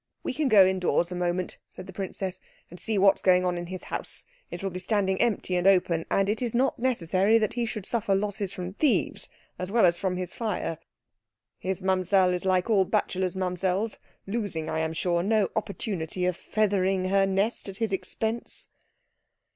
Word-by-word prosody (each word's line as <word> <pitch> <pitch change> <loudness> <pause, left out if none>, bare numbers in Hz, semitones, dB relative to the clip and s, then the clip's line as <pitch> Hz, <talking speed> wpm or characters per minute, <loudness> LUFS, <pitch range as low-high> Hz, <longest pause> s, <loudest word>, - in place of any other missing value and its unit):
"We - - -2
can 300 +1 0
go 205 -6 +7
indoors 185 -2 +1
a - - -3
moment," 180 0 -2
said 185 - -7
the 190 - -10
princess, 190 0 -4 0.3
"and 175 - -10
see 220 -2 -1
what 195 0 +5
is - - -6
going 185 -1 +4
on 180 -1 +1
in 175 0 -5
his 185 0 -6
house. - - -4 0.2
It - - -7
will 195 - -1
be 180 - -5
standing 190 0 +1
empty 200 -5 +1
and 180 +1 +2
open, 175 -4 +3
and 195 0 +2
it 215 +3 -1
is 240 -2 -1
not 260 +1 +1
necessary 210 -3 +3
that 215 -2 0
he 235 -1 -1
should 215 -3 -5
suffer 220 -4 +1
losses 200 -1 -1
from 180 0 -6
thieves 285 +4 +1 0.3
as 185 - -3
well 225 0 +4
as 170 -1 +3
from 185 -2 -1
fire. 180 -4 -3 0.8
His 190 0 -3
Mamsell 185 0 +3
is 180 +1 -3
like 185 0 +2
all 210 -4 +4
bachelors' 185 0 0
Mamsells 185 +3 -1 0.3
losing, 195 -7 -2
I 160 - -1
am 160 0 -1
sure, 170 +1 0
no 210 +1 +2
opportunity 190 -5 -2
of 180 -1 +1
feathering 195 -2 0
her 195 0 +3
nest 195 +3 0
at 195 - -8
his 225 -1 -1
expense." 220 +4 -3
190 Hz, 190 wpm, -27 LUFS, 180-210 Hz, 0.8 s, go